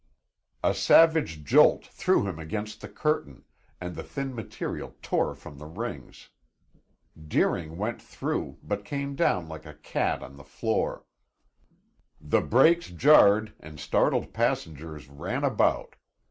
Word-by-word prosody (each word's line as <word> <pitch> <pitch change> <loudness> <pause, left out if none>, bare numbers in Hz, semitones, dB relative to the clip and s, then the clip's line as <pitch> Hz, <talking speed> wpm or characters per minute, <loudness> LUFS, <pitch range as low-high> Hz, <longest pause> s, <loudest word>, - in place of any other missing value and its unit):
A - - +3
savage 160 - +4
jolt - - +5
threw - - +1
him 85 -4 -5
against 105 +7 -5
the 105 - -7
curtain, 105 - -2 0.3
and 90 -1 -6
the - - -5
thin 135 -1 -5
material 115 -4 -6
tore - - 0
from 70 - -12
the 75 - -9
rings. 85 - -7 1.0
Deering 80 +1 0
went 110 +4 -3
through, - - -4
but 105 0 -3
came 140 +5 -4
down 95 - +1
like 80 0 -9
a 75 - -11
cat 75 - -2
on 70 +1 -11
the 70 - -12
floor. 70 - -2 1.1
The - - +1
brakes 165 +8 +4
jarred 110 - +5
and 75 -1 -12
startled - - +1
passengers 75 -1 -2
ran 70 +1 -4
about. - - +1
90 Hz, 130 wpm, -27 LUFS, 75-120 Hz, 1.1 s, jolt